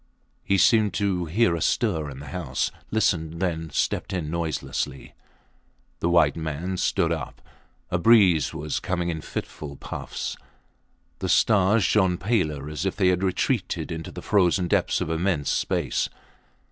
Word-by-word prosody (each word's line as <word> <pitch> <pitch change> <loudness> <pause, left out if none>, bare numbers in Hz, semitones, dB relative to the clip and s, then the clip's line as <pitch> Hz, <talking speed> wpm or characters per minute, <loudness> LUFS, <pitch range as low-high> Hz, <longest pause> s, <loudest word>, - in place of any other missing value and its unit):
He 100 - +2
seemed 105 0 +4
to 95 -4 0
hear 90 +2 +2
a 85 - -4
stir 80 -10 0
in 65 - -9
the 70 - -9
house 70 -5 -2 0.2
listened 85 -7 0
then 80 -3 -2
stepped - - -1
in 80 -5 -3
noiselessly. 80 -4 -3 0.9
The 85 - 0
white 80 -4 +4
man 80 +3 -3
stood - - +1
up. - - -4 0.5
A 90 - +1
breeze 95 -6 +5
was 75 0 -3
coming 90 -2 -2
in 80 -2 -3
fitful 75 -1 -6
puffs. - - -5 0.8
The - - -3
stars 105 0 +4
shone 95 -1 +3
paler 80 - -1
as 75 +1 -4
if 95 - -1
they 95 -3 +3
had 90 0 +1
retreated 95 - -1
into 80 -1 -5
the - - -9
frozen 90 -2 +2
depths - - +1
of 80 - -2
immense 80 -3 0
space. - - 0
85 Hz, 150 wpm, -25 LUFS, 80-95 Hz, 0.9 s, breeze